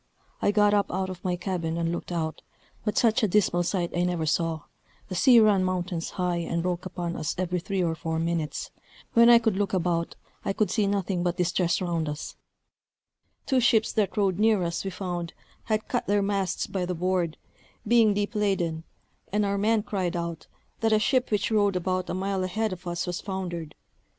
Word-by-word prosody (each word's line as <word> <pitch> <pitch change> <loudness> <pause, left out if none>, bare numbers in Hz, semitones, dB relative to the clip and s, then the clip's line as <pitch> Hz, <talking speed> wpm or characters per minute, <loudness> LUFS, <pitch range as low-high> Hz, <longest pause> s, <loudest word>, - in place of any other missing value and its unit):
I - - +3
got 205 0 +4
up 200 -1 +2
out 190 +1 -2
of 180 -1 -10
my 180 -1 0
cabin 175 -3 -3
and 165 0 0
looked 170 - -5
out; 160 -2 -2 0.4
but 210 - -2
such 225 -2 +3
a 215 - +3
dismal 180 -3 +2
sight 175 -1 -1
I 175 - +1
never 175 -2 0
saw: 160 0 0 0.5
the - - -4
sea 235 +7 +6
ran 210 -4 +4
mountains 180 -2 -2
high, 180 -2 0
and 170 0 -2
broke 180 0 -2
upon 175 -2 -4
us 155 - -2
every 180 0 -1
three 190 +1 -1
or 165 -1 +1
four 160 0 -3
minutes; 165 -2 -2 0.4
when 235 0 +7
I 240 - +9
could 225 -4 +1
look 200 -1 -1
about, 170 -2 0 0.3
I - - -1
could 215 +1 0
see 210 -3 +1
nothing 195 -2 0
but 175 0 -1
distress 180 -1 +1
round 170 -4 -1
us; 150 +1 -6 1.1
two 265 -2 +2
ships 225 -2 +3
that 210 -1 0
rode 195 -2 +1
near 215 -3 +3
us, 170 -1 -2
we 195 - -2
found, 175 -3 -4 0.3
had 215 -1 -1
cut - - -2
their 205 0 +2
masts 195 -2 -1
by 190 -2 -3
the 180 0 -2
board, 175 -1 0 0.5
being 225 -2 +5
deep 205 +2 -1
laden; 185 -6 0 0.5
and 210 +1 +1
our 200 0 0
men 215 +1 +2
cried 185 -4 -2
out, 170 -2 -4 0.3
that 225 0 +1
a 215 - +5
ship 255 +4 +1
which 210 0 0
rode 205 -3 +3
about 185 +1 -1
a - - -2
mile 190 0 -1
ahead 215 +3 -1
of 185 0 -10
us 175 0 -2
was 180 -1 -3
foundered. 175 -5 -5
185 Hz, 200 wpm, -27 LUFS, 170-205 Hz, 1.1 s, I